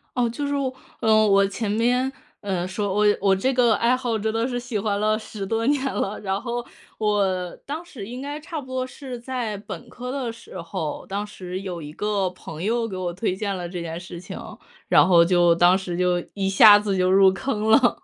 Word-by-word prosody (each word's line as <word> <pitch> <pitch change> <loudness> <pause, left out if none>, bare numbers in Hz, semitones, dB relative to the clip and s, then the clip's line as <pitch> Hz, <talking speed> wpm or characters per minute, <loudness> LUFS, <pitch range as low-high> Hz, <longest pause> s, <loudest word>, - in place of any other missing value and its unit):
哦， 245 -2 +2
就 285 +5 -3
是 285 - -1
我 270 -2 -1 0.3
嗯， 215 -1 +4
我 200 0 +5
前 200 +2 -3
面， 245 +5 +2 0.3
呃， 185 -3 -2
说 190 +1 -2
我 210 0 +3
我 195 -1 +3
这 260 +8 0
个 245 -3 +4
爱 235 +4 +3
好 245 -3 -1
真 220 +1 -2
的 225 +2 0
是 245 -2 -3
喜 245 -3 -3
欢 200 0 -1
了 215 +1 +1
10 215 -2 -7
多 225 +3 -1
年 285 -1 +2
了， 200 +2 -2
然 195 0 -2
后 240 0 -3 0.3
我 195 -4 0
当 305 +4 -5
时 255 - -9
应 250 +3 -7
该 290 +2 -5
差 310 0 -6
不 - - -12
多 260 0 -2
是 260 -2 -8
在 235 -4 -3
本 195 -4 -9
科 250 +1 -7
的 260 -4 -2
时 230 -5 -11
候， 165 -3 -5
当 200 +2 -4
时 185 -2 -6
有 185 -3 -5
一 150 -1 -8
个 200 +2 -1
朋 165 -2 -9
友 230 +2 0
给 195 - -6
我 185 -1 -2
推 185 +2 -2
荐 200 0 -2
了 175 -1 -4
这 175 0 -5
件 165 0 -5
事 175 -1 -9
情， - - -8 0.5
然 - - +6
后 175 -2 +6
就， 175 -1 +4
当 175 +2 +5
时 180 -2 -4
就 180 -1 +1
一 195 -1 -1
下 205 +2 +8
子 205 -2 -1
就 185 0 +2
入 190 0 +6
坑 215 0 -2
了。 245 +2 +4
210 Hz, 235 characters per minute, -23 LUFS, 185-240 Hz, 0.5 s, 下